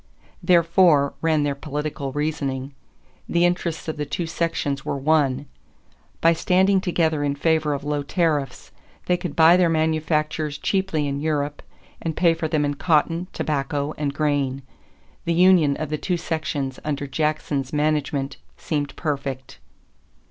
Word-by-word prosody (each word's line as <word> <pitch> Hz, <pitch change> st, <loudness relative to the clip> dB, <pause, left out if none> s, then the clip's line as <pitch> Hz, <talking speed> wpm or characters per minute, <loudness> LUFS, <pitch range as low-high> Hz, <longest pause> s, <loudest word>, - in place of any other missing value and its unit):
Therefore, 170 Hz, -4 st, +4 dB
ran 160 Hz, -2 st, +2 dB
their 145 Hz, -1 st, 0 dB
political 145 Hz, 0 st, -4 dB
reasoning, 140 Hz, -2 st, -3 dB, 0.6 s
the 170 Hz, 0 st, +3 dB
interests 175 Hz, -2 st, -1 dB
of 160 Hz, -, -3 dB
the 150 Hz, -, -2 dB
two 155 Hz, +4 st, -2 dB
sections 165 Hz, -4 st, -2 dB
were -, -, -2 dB
one. 140 Hz, -2 st, +1 dB, 0.8 s
By 165 Hz, +1 st, +5 dB
standing 190 Hz, +3 st, +3 dB
together 160 Hz, -5 st, 0 dB
in 140 Hz, -1 st, 0 dB
favor 155 Hz, 0 st, +1 dB
of 140 Hz, -, -6 dB
low 145 Hz, 0 st, -1 dB
tariffs, 145 Hz, -3 st, -1 dB, 0.3 s
they 180 Hz, -, +2 dB
could 180 Hz, 0 st, -5 dB
buy 165 Hz, +1 st, +7 dB
their 180 Hz, -2 st, +3 dB
manufactures 155 Hz, -1 st, 0 dB
cheaply 190 Hz, -5 st, 0 dB
in 140 Hz, 0 st, -3 dB
Europe 145 Hz, -1 st, -1 dB, 0.4 s
and 160 Hz, -2 st, -3 dB
pay 170 Hz, -2 st, +4 dB
for 165 Hz, -1 st, -3 dB
them 155 Hz, -2 st, +1 dB
in 145 Hz, -, 0 dB
cotton, 165 Hz, +3 st, +1 dB
tobacco, 145 Hz, 0 st, -2 dB
and 145 Hz, -2 st, -2 dB
grain. 140 Hz, -2 st, -1 dB, 0.6 s
The 170 Hz, -, +1 dB
union 175 Hz, -5 st, +5 dB
of 155 Hz, -, -4 dB
the 155 Hz, -, -1 dB
two 180 Hz, -2 st, -1 dB
sections 145 Hz, -5 st, -3 dB
under 145 Hz, -1 st, -2 dB
Jackson's 145 Hz, -2 st, -1 dB
management 145 Hz, -2 st, -1 dB, 0.2 s
seemed 145 Hz, -3 st, -3 dB
perfect. 140 Hz, -4 st, -4 dB
150 Hz, 145 wpm, -23 LUFS, 145-165 Hz, 0.8 s, buy